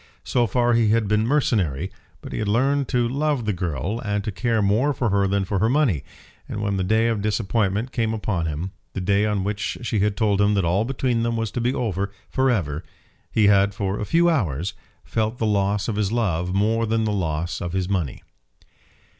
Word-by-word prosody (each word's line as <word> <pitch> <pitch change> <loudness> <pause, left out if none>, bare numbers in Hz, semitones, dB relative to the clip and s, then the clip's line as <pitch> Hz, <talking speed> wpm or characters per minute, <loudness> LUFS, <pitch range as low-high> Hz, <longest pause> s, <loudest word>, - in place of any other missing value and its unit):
So 120 -2 +1
far 120 +3 +2
he 115 -1 +3
had 110 -1 +2
been 105 +2 +2
mercenary; 95 - +1 0.3
but - - -8
he - - -3
had 110 - -1
learned 135 +6 +2
to 120 -1 +1
love 140 -1 0
the 105 - +1
girl, 90 - -2
and 105 -2 -1
to 110 - -3
care 115 +3 0
more 110 +8 +2
for 120 -3 0
her 100 0 +2
than 100 0 0
for 100 0 -1
her 110 +3 +2
money, 130 - +2 0.5
and - - -4
when 100 -2 -1
the 95 - 0
day 110 +4 +2
of 115 -3 0
disappointment 110 +1 0
came 115 -4 0
upon 105 -6 -1
him, 80 +5 -4 0.2
the - - -3
day 100 +3 +2
on 105 -2 0
which 105 +1 -2
she 110 -2 0
had 100 0 +1
told 105 -3 +2
him 105 0 +3
that 100 -3 +1
all 95 +6 +2
between 125 -2 0
them 115 0 0
was 115 -2 -2
to 120 - -3
be 125 +3 +1
over 100 -4 -2 0.2
for 130 0 +2
ever, 80 - -1 0.5
he 110 - +3
had, 100 0 +4
for 100 -1 -2
a 105 - -2
few 170 +8 +3
hours, 95 - 0 0.3
felt 110 +2 -1
the 115 - -1
loss 100 -1 +1
of 110 -3 -2
his 105 -2 0
love 90 -7 0
more 110 +4 +1
than 110 +1 +1
the 110 - 0
loss 85 -2 -2
of 90 -2 -4
his 95 -1 0
money. 90 -9 -2
105 Hz, 220 wpm, -23 LUFS, 95-115 Hz, 0.5 s, had